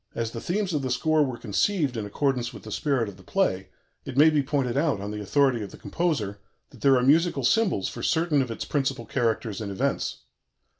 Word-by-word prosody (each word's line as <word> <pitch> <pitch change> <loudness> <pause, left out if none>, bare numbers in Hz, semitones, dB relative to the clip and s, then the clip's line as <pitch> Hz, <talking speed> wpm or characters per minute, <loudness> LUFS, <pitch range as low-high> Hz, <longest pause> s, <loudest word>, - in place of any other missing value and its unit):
As 115 -1 -2
the 115 - -6
themes 190 0 -1
of 150 - 0
the 130 - -2
score 155 +5 +2
were 130 -4 -3
conceived 140 - 0
in 110 -2 -3
accordance 125 +2 -1
with - - -11
the - - -9
spirit 135 -6 0
of 100 -2 -9
the 95 - -16
play, - - 0 0.3
it 125 - -7
may 155 +2 +7
be 150 -2 +3
pointed 135 -3 -1
out, 145 -6 +1
on 100 +1 -5
the 105 0 -5
authority 130 +2 +2
of 100 - -5
the - - -12
composer, 115 - -2 0.3
that - - -16
there 135 -2 +5
are 125 - +1
musical 150 +1 +3
symbols 190 - +2
for - - -7
certain 160 -3 +2
of 130 - -2
its 115 - -4
principal 135 -4 -1
characters 110 -2 -1
and 100 -2 -4
events. 95 - -2
130 Hz, 220 wpm, -26 LUFS, 115-150 Hz, 0.3 s, may